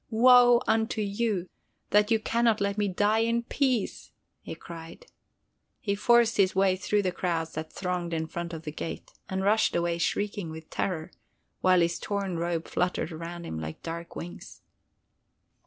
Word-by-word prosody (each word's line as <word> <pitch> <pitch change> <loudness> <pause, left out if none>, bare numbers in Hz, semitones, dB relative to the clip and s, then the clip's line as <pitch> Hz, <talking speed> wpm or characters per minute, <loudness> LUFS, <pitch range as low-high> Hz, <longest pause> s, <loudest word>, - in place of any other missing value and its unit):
"Woe 245 +1 +6
unto 220 0 +1
you, 205 -2 -1 0.4
that 210 +1 +4
you 225 - +4
can 235 +2 0
not 225 -2 +3
let 200 0 0
me 205 -1 0
die 205 +3 +2
in 230 +1 +1
peace!" 255 -4 -1 0.3
he - - -7
cried. 165 - -10 0.7
He 200 -5 -1
forced 235 +2 +4
his 190 -2 +3
way 190 -1 +3
through 205 +2 0
the 185 - 0
crowds 165 -3 -2
that 155 0 -6
thronged 180 -2 -3
in 160 -1 -1
front 170 +1 -5
of 165 -1 -7
the 150 - -5
gate, 160 - -6 0.2
and 190 0 -2
rushed 215 +2 +3
away 170 0 0
shrieking 200 0 -1
with 160 0 -10
terror, 160 -4 -2 0.5
while 185 -1 +4
his 170 0 +1
torn 200 -4 -2
robe 170 -1 -2
fluttered 180 -1 -1
around 170 +2 -6
him 80 - -5
like 80 0 -7
dark 170 +1 -6
wings. 175 +1 -9
190 Hz, 170 wpm, -28 LUFS, 170-215 Hz, 0.7 s, Woe